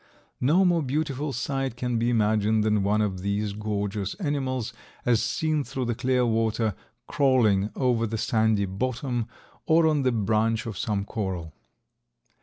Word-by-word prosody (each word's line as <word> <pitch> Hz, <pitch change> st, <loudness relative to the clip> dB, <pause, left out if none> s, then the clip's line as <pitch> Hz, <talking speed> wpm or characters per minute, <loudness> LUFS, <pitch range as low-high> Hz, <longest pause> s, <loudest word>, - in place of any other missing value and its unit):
No 165 Hz, +9 st, +4 dB
more 175 Hz, -2 st, +3 dB
beautiful 145 Hz, 0 st, -2 dB
sight 135 Hz, 0 st, -2 dB
can 125 Hz, -1 st, -1 dB
be 120 Hz, +1 st, +1 dB
imagined 110 Hz, -1 st, +2 dB
than 105 Hz, -1 st, +2 dB
one 105 Hz, +2 st, +2 dB
of 95 Hz, -3 st, -1 dB
these 100 Hz, +1 st, -1 dB
gorgeous 105 Hz, -1 st, -3 dB
animals, 135 Hz, -, -2 dB, 0.3 s
as 120 Hz, -2 st, +3 dB
seen 150 Hz, +6 st, 0 dB
through 130 Hz, -2 st, -4 dB
the 120 Hz, -, 0 dB
clear 125 Hz, +2 st, +1 dB
water, 110 Hz, -1 st, +1 dB, 0.3 s
crawling 120 Hz, -10 st, +3 dB
over 120 Hz, -3 st, +1 dB
the 110 Hz, +1 st, -3 dB
sandy 110 Hz, -2 st, +2 dB
bottom 120 Hz, +4 st, -2 dB, 0.4 s
or 160 Hz, 0 st, +5 dB
on 155 Hz, -2 st, +3 dB
the 130 Hz, -1 st, +2 dB
branch 110 Hz, 0 st, +1 dB
of 115 Hz, -3 st, -5 dB
some 100 Hz, -1 st, -2 dB
coral. 95 Hz, -8 st, -4 dB
115 Hz, 150 wpm, -26 LUFS, 105-130 Hz, 0.4 s, or